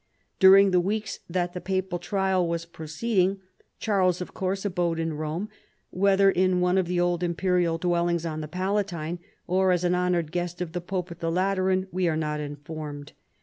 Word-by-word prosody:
During 195 0 +8
the 180 - +4
weeks 210 +4 -2
that 175 0 -1
the 180 - -5
papal 190 -1 -2
trial 190 0 0
was 170 0 -2
pro 160 -2 -10
ceeding 195 +3 +1 0.4
Charles, 185 -5 +1
of 180 - -6
course, 190 +1 -2
abode 175 -4 0
in 165 -1 -1
Rome, 155 +6 -3 0.4
whether 195 +1 +4
in 185 0 +2
one 180 +1 +3
of 185 - 0
the 175 0 0
old 175 -1 +1
imperial 175 -1 +1
dwellings 170 -1 0
on 155 -1 -3
the 155 - -5
Palatine, 180 -2 -2 0.3
or 185 +1 +2
as 180 -1 +1
an 175 0 +2
honored 180 -3 0
guest 175 0 -3
of 180 -3 -3
the 175 +1 -4
pope 180 0 -4
at 170 - -9
the 165 - -1
Lateran, 185 +1 +1
Ave 185 -1 +1
are 160 -2 +1
not 150 -1 -2
informed. 145 0 -7
180 Hz, 190 wpm, -26 LUFS, 170-190 Hz, 0.4 s, During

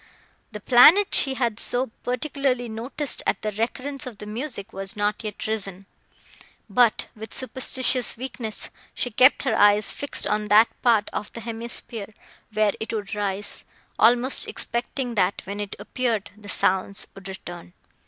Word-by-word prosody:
The 210 - -7
planet 300 - +6
she 270 -1 +4
had 235 -3 -1
so 245 -1 +1
particularly 255 -1 -1
noticed, 240 +5 -1
at 195 - 0
the 215 - -1
recurrence 255 +6 -3
of 235 -5 -8
the 210 - -9
music, 225 -1 -5
was 195 0 -5
not 210 +1 -1
yet 210 -2 -5
risen; 195 -3 -4 0.8
but, 230 +1 +3
with 220 0 -6
superstitious 260 -1 +1
weakness, 240 -3 -5 0.2
she 245 - -1
kept 255 +5 +5
her 255 -5 +1
eyes 205 0 +4
fixed 285 - -1
on 210 0 -1
that 215 +2 +6
part 225 -4 +3
of 210 - -4
the 230 - -7
hemisphere, 225 -2 -3 0.4
where 215 -1 +2
it 220 - -5
would 210 -3 -4
rise, 205 -1 -2 0.4
almost 245 +4 +4
expecting, 245 +1 -3
that, 195 -3 0
when 200 +1 -6
it 205 -1 -5
appeared, 235 -5 -2
the 210 -1 -13
sounds 190 +1 +1
would 195 -1 -11
return. 175 -2 -9
220 Hz, 155 wpm, -24 LUFS, 205-250 Hz, 0.8 s, planet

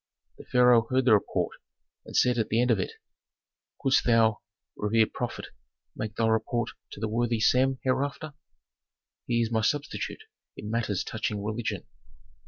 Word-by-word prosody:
The - - -11
pharaoh 125 -2 +4
heard 130 0 +2
the 120 - +6
report, 105 - 0 0.5
and - - -3
said 125 -1 +3
at 110 - 0
the 110 - +1
end 125 0 +3
of 110 - +2
it, 95 - -3 0.9
"Couldst 135 -1 +3
thou, 115 -2 +3 0.3
revered 110 +1 +1
prophet, 120 -1 -4 0.5
make 110 -1 -5
thy 115 - +1
report 110 +1 0 0.2
to - - -9
the 110 - -1
worthy 115 +1 0
Sem 130 +4 +3
hereafter? 140 +3 -1 0.9
He 120 -1 +1
is 115 - -3
my 110 -1 +1
substitute 145 +6 -2 0.3
in 105 - -6
matters 110 -5 -1
touching 105 -2 -3
religion." 110 +2 -3
115 Hz, 155 wpm, -27 LUFS, 110-125 Hz, 0.9 s, the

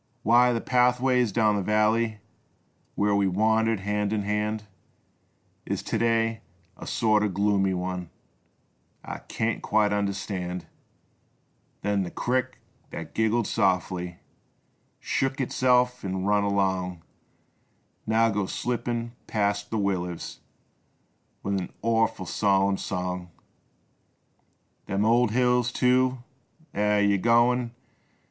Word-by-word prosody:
63 - - -3
Why 125 +1 +6
th' - - -12
pathway 125 0 +3
down 105 -1 +2
th' - - -4
valley 110 +1 +1 0.7
Where 105 0 +2
we 100 -1 +2
wandered 110 +2 +2
hand 105 +1 -1
in 105 -2 0
hand 105 +1 -1 1.0
Is - - -3
to 110 - -2
day 115 -1 +1 0.3
a - - -10
sorter 110 -2 +2
gloomy 100 -1 +1
one 90 -1 -4 1.0
I - - -6
kint 110 0 -2
quite 105 -1 +2
understand, 95 -3 -3 1.2
Then 100 0 +1
the 90 - -3
crick 130 +4 -1 0.3
thet - - -8
giggled 110 +1 +1
softly, 90 -4 0 0.8
Shook 135 0 -1
itself 125 -1 +2
'n' 95 -1 -3
run 105 0 +2
along 95 -3 -1 1.0
Now 115 +1 +3
goes 100 -2 -2
slippin' 120 -1 -2 0.2
past 105 -1 -1
the 110 - -2
willers 90 -4 -2 1.0
With 100 0 0
an 90 - -6
orful 115 -3 +1
solemn 100 +1 +2
song. 90 -2 -4 1.6
Them 100 +2 0
old 120 +1 +4
hills, 125 +1 +2
too 125 0 +2 0.3
— 160 0 -32
eh! 105 0 +2
Yer 100 -1 +3
goin' 120 +2 +2
105 Hz, 115 wpm, -26 LUFS, 100-115 Hz, 1.6 s, Why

